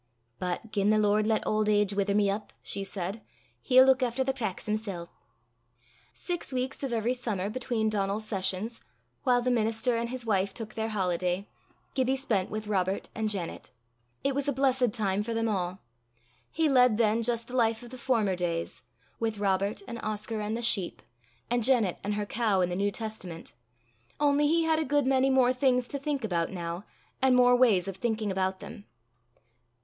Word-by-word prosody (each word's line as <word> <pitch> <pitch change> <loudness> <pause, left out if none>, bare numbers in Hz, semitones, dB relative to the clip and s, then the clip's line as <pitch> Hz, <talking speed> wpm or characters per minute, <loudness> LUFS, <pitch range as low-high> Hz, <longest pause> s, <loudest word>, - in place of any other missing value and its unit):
"But 180 +5 -3
gien 200 0 +1
the 215 - +4
Lord 210 0 +3
lat 220 -1 +1
auld 215 0 +1
age 205 -1 +3
wither 200 0 0
me 205 -1 +3
up," 205 +2 -3
she 200 - -2
said, 195 +2 -4 0.4
"he'll 260 0 +6
luik 265 0 +4
efter 250 +1 0
the 270 0 0
cracks 220 -8 -4
himsel'." 210 -5 -3 1.0
Six 350 -5 -4
weeks 260 +2 -3
of 270 -3 -3
every 230 +1 +1
summer 210 -6 -2
between 240 -2 -1
Donal's 205 0 -1
sessions, 195 +2 -2 0.4
while 245 -2 +2
the 250 - +1
minister 225 +1 +1
and 235 0 -2
his 255 -1 -6
wife 195 -3 0
took 220 -2 -6
their 220 0 -2
holiday, 180 -1 -1 0.5
Gibbie 260 0 +1
spent 230 -8 -1
with 215 0 -4
Robert 195 -2 -1
and 220 -1 -1
Janet. 190 -5 -3 0.5
It 275 - +1
was 280 +1 -1
a - - +3
blessed 260 -3 +2
time 205 -3 0
for 230 +2 -3
them 225 0 0
all. 185 -3 -2 0.7
He 325 -1 +1
led 250 -5 +5
then 225 0 +3
just 235 0 -1
the 250 - -6
life 230 -1 +2
of 240 - -11
the - - -7
former 225 -7 +1
days, 170 -2 -3 0.4
with 225 -2 -1
Robert 200 0 0
and 235 -1 -6
Oscar 215 +1 -3
and 210 +2 -2
the 235 - -4
sheep, 195 -6 +2 0.4
and 240 0 0
Janet 230 -7 +3
and 205 +1 -1
her 210 0 -2
cow 210 -3 +1
and 180 0 +1
the - - -1
New 200 +2 +1
Testament 200 -6 -7 0.7
only 290 0 +3
he 330 +2 +3
had 320 -1 +2
a - - +1
good 290 -2 +1
many 265 0 +3
more 255 -1 +4
things 250 -1 +2
to 280 - -3
think 280 -2 -2
about 170 -6 0
now, 175 +1 -5 0.4
and 260 -1 +5
more 245 0 +6
ways 215 -8 +4
of 195 -1 -5
thinking 220 -1 -1
about 190 0 0
them. 205 - -9
220 Hz, 190 wpm, -28 LUFS, 200-250 Hz, 1.0 s, he'll